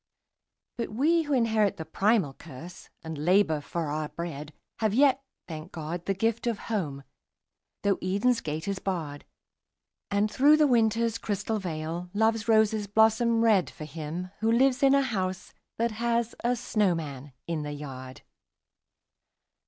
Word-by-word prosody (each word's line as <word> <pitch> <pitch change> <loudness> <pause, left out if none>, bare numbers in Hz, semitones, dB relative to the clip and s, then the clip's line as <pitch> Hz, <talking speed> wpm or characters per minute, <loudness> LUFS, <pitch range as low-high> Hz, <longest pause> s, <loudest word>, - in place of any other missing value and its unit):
But 230 - -2
we 305 +10 +2
who 295 -2 -2
inherit 220 -5 +2
the 160 - -6
primal 195 -2 +1
curse, 165 +5 -11
and 160 -2 -6
labour 175 -3 +3
for 165 -1 -3
our 155 0 -2
bread, 155 -3 -6 0.3
Have 220 -2 +1
yet, 275 0 +4 0.3
thank 160 +1 -8
God, 165 +2 -6
the 195 - +1
gift 225 +4 0
of 230 -3 0 0.2
Home, 145 -9 -2 0.8
though 200 -2 +2
Eden's 205 +6 +1
gate 155 +4 -4
is 200 -1 -2
barred: 160 -7 -4 0.8
And 205 +1 +1
through 290 +6 +5
the 305 - +5
Winter's 230 -3 +2
crystal 210 +1 -2
veil, 170 0 -4
Love's 220 0 +1
roses 220 -2 +3
blossom 225 +2 +3
red, 210 -6 +4
For 155 - -9
him 160 +4 -6
who 225 +1 +2
lives 255 +3 +3
in 275 0 +5
a 275 - +4
house 190 -7 -3 0.2
that 235 0 +1
has 235 +1 -1
a 245 +1 +2
snowman 165 - -1
in 165 -2 -2
the 150 0 -5
yard. 130 -3 -8
200 Hz, 150 wpm, -28 LUFS, 160-230 Hz, 0.8 s, through